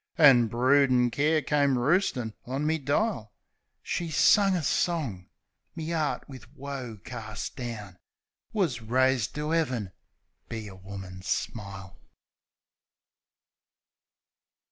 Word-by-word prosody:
An' 135 Hz, -8 st, +7 dB
broodin' 125 Hz, +1 st, +3 dB
care 150 Hz, +4 st, +2 dB
come 140 Hz, -1 st, +2 dB
roostin' 125 Hz, -, +1 dB
on 135 Hz, +4 st, -2 dB
me 160 Hz, +1 st, +1 dB
dile. 145 Hz, -, 0 dB, 0.5 s
She 170 Hz, -2 st, -2 dB
sung 195 Hz, +5 st, +5 dB
a 170 Hz, -, -1 dB
song... 140 Hz, -, -1 dB, 0.5 s
Me 165 Hz, 0 st, -4 dB
'eart, 155 Hz, -3 st, -1 dB
wiv 130 Hz, -3 st, -11 dB
woe 135 Hz, -5 st, -6 dB
carst 110 Hz, -4 st, -6 dB
down, 105 Hz, -7 st, -6 dB, 0.5 s
Wus 165 Hz, -, 0 dB
raised 125 Hz, 0 st, +1 dB
to 150 Hz, +2 st, -2 dB
'Eaven 125 Hz, -, 0 dB, 0.6 s
be 110 Hz, -2 st, -5 dB
a 95 Hz, -, -10 dB
woman's 95 Hz, -1 st, -9 dB
smile. 100 Hz, -4 st, -4 dB
130 Hz, 105 wpm, -28 LUFS, 110-150 Hz, 0.6 s, An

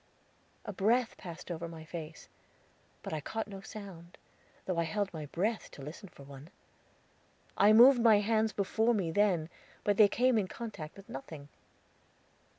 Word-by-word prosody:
A 210 Hz, -, -5 dB
breath 225 Hz, +6 st, +1 dB
passed 170 Hz, 0 st, -9 dB
over 170 Hz, 0 st, -4 dB
my 160 Hz, -1 st, -10 dB
face; 160 Hz, -1 st, -8 dB, 0.8 s
but -, -, -5 dB
I 155 Hz, -, -2 dB
caught 220 Hz, +8 st, -4 dB
no 195 Hz, -2 st, -9 dB
sound, 195 Hz, -5 st, -10 dB, 0.5 s
though 180 Hz, -3 st, -1 dB
I -, -, +2 dB
held 195 Hz, +4 st, -2 dB
my 155 Hz, -2 st, -6 dB
breath 210 Hz, +9 st, -2 dB
to 140 Hz, -, -10 dB
listen 170 Hz, +7 st, -9 dB
for 140 Hz, -, -15 dB
one. 140 Hz, +2 st, -12 dB, 1.1 s
I 205 Hz, +1 st, +5 dB
moved 240 Hz, +3 st, +8 dB
my 225 Hz, -2 st, +6 dB
hands 220 Hz, +1 st, +1 dB
before 220 Hz, +4 st, +1 dB
me 180 Hz, -6 st, -1 dB
then, 180 Hz, -4 st, +2 dB, 0.4 s
but 205 Hz, -1 st, +1 dB
they 215 Hz, -, +8 dB
came 245 Hz, +3 st, +2 dB
in 195 Hz, -, -1 dB
contact 190 Hz, -9 st, -8 dB
with 195 Hz, -, -13 dB
nothing. 140 Hz, +2 st, -9 dB
195 Hz, 160 wpm, -31 LUFS, 160-215 Hz, 1.1 s, moved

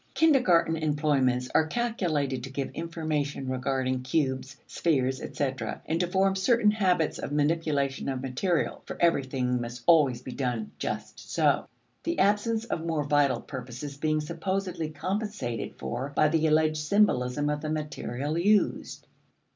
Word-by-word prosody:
Kindergarten 200 Hz, -, +4 dB
employments 145 Hz, -5 st, +1 dB
are 160 Hz, -, +4 dB
calculated 160 Hz, -, -1 dB
to 135 Hz, -, -6 dB
give 135 Hz, 0 st, -4 dB
information 155 Hz, -5 st, -3 dB
regarding 130 Hz, 0 st, -1 dB
cubes, 130 Hz, -1 st, -1 dB
spheres, 135 Hz, -5 st, 0 dB
etc., 130 Hz, -6 st, -3 dB
and 165 Hz, +1 st, -1 dB
to 180 Hz, -, +1 dB
form 190 Hz, +2 st, +2 dB
certain 210 Hz, +2 st, +3 dB
habits 185 Hz, -7 st, +1 dB
of -, -, -5 dB
manipulation 145 Hz, -3 st, 0 dB
of 130 Hz, -1 st, -2 dB
material 135 Hz, +7 st, -1 dB
(for -, -, -6 dB
everything 130 Hz, -6 st, +1 dB
must 120 Hz, 0 st, -6 dB
always 140 Hz, -8 st, +4 dB
be 130 Hz, -, -6 dB
done 125 Hz, -4 st, -2 dB
"just -, -, -4 dB
so"), -, -, +2 dB, 0.3 s
the 335 Hz, +1 st, -2 dB
absence 220 Hz, +3 st, +2 dB
of 165 Hz, -8 st, -3 dB
more 160 Hz, -3 st, -1 dB
vital 145 Hz, -1 st, +2 dB
purposes 130 Hz, +1 st, -7 dB
being 155 Hz, +1 st, 0 dB
supposedly 170 Hz, +1 st, -3 dB
compensated 185 Hz, -, -3 dB
for 125 Hz, -, -4 dB
by 155 Hz, -, +5 dB
the 160 Hz, +1 st, +2 dB
alleged 155 Hz, 0 st, +3 dB
symbolism 150 Hz, -6 st, +2 dB
of 150 Hz, 0 st, -1 dB
the 155 Hz, -, -3 dB
material 150 Hz, -1 st, -3 dB
used. 205 Hz, +3 st, +1 dB
150 Hz, 140 wpm, -28 LUFS, 130-170 Hz, 0.3 s, by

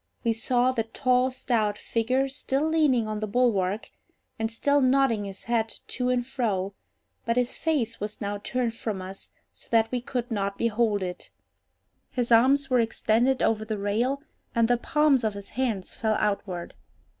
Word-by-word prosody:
We 230 Hz, -2 st, +2 dB
saw 245 Hz, +2 st, +2 dB
the 245 Hz, -3 st, 0 dB
tall 250 Hz, +2 st, +2 dB
stout 230 Hz, -5 st, 0 dB
figure 255 Hz, +6 st, 0 dB
still 275 Hz, +2 st, -1 dB
leaning 295 Hz, -8 st, +3 dB
on 215 Hz, 0 st, -3 dB
the 215 Hz, -, -2 dB
bulwark, 210 Hz, -3 st, +1 dB, 0.5 s
and 225 Hz, 0 st, -1 dB
still 285 Hz, +5 st, +2 dB
nodding 255 Hz, -5 st, +3 dB
his 195 Hz, -1 st, -8 dB
head 225 Hz, -1 st, 0 dB, 0.2 s
to 250 Hz, 0 st, -1 dB
and 250 Hz, -1 st, +1 dB
fro, 205 Hz, -7 st, -1 dB, 0.5 s
but 230 Hz, +1 st, 0 dB
his 250 Hz, 0 st, +1 dB
face 275 Hz, -9 st, -1 dB
was 210 Hz, +1 st, -5 dB
now 205 Hz, 0 st, -3 dB
turned 240 Hz, +2 st, -1 dB
from 220 Hz, -3 st, -4 dB
us 190 Hz, +1 st, -8 dB, 0.2 s
so -, -, -13 dB
that 225 Hz, -1 st, +3 dB
we 250 Hz, -1 st, -1 dB
could 245 Hz, -1 st, -4 dB
not 200 Hz, -2 st, -1 dB
behold 220 Hz, -3 st, +1 dB
it. 180 Hz, -1 st, -6 dB, 0.8 s
His 245 Hz, -1 st, -2 dB
arms 270 Hz, +5 st, +5 dB
were 255 Hz, -2 st, +3 dB
extended 230 Hz, +3 st, +2 dB
over 220 Hz, -1 st, +2 dB
the 215 Hz, 0 st, -3 dB
rail, 235 Hz, +8 st, 0 dB, 0.3 s
and 230 Hz, -1 st, +4 dB
the 245 Hz, 0 st, +3 dB
palms 290 Hz, 0 st, +2 dB
of 215 Hz, -2 st, 0 dB
his 200 Hz, -1 st, -8 dB
hands 230 Hz, -8 st, -2 dB
fell 220 Hz, -1 st, 0 dB
outward. 200 Hz, -4 st, -2 dB
230 Hz, 170 wpm, -26 LUFS, 210-255 Hz, 0.8 s, arms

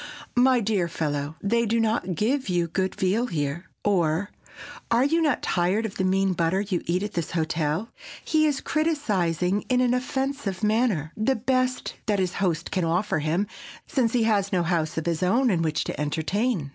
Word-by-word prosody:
_, -, -, -9 dB, 0.4 s
"My 255 Hz, -1 st, +4 dB
dear 200 Hz, -5 st, +1 dB
fellow, 150 Hz, -2 st, -3 dB
they 235 Hz, +3 st, +2 dB
do 230 Hz, +2 st, +1 dB
not 215 Hz, -5 st, 0 dB
give 255 Hz, -, 0 dB
you 175 Hz, -1 st, +1 dB
good 185 Hz, +3 st, -2 dB
veal 205 Hz, +6 st, +1 dB
here!" 155 Hz, -, -3 dB, 0.2 s
or, 180 Hz, -1 st, +1 dB, 0.6 s
"Are 235 Hz, +2 st, +4 dB
you 325 Hz, +4 st, +2 dB
not 295 Hz, -5 st, +1 dB
tired 185 Hz, +5 st, +1 dB
of 210 Hz, -, -4 dB
the 190 Hz, -, 0 dB
mean 190 Hz, 0 st, +2 dB
butter 170 Hz, +2 st, +1 dB
you 195 Hz, -4 st, -2 dB
eat 180 Hz, +3 st, 0 dB
at 210 Hz, -, -4 dB
this 170 Hz, -2 st, -2 dB
hotel?" 160 Hz, +4 st, -1 dB, 0.3 s
he 310 Hz, -1 st, +3 dB
is 285 Hz, -3 st, -1 dB
criticizing 205 Hz, -, 0 dB
in 250 Hz, -1 st, +3 dB
an 250 Hz, -1 st, +3 dB
offensive 260 Hz, -6 st, -2 dB
manner 210 Hz, -8 st, +1 dB
the 260 Hz, +5 st, +1 dB
best 255 Hz, +2 st, 0 dB
that 210 Hz, -2 st, +2 dB
his 185 Hz, -1 st, 0 dB
host 170 Hz, -4 st, 0 dB
can 185 Hz, -, 0 dB
offer 170 Hz, +2 st, 0 dB
him, 160 Hz, +6 st, 0 dB, 0.4 s
since 240 Hz, -5 st, 0 dB
he 240 Hz, -2 st, +3 dB
has 205 Hz, -3 st, +1 dB
no 180 Hz, -3 st, +2 dB
house 165 Hz, -2 st, -1 dB
of 160 Hz, -, -2 dB
his 170 Hz, -1 st, -1 dB
own 230 Hz, +7 st, +3 dB
in 170 Hz, -3 st, +1 dB
which 155 Hz, -2 st, 0 dB
to -, -, -4 dB
entertain. 165 Hz, -, -1 dB
195 Hz, 190 wpm, -25 LUFS, 170-235 Hz, 0.6 s, My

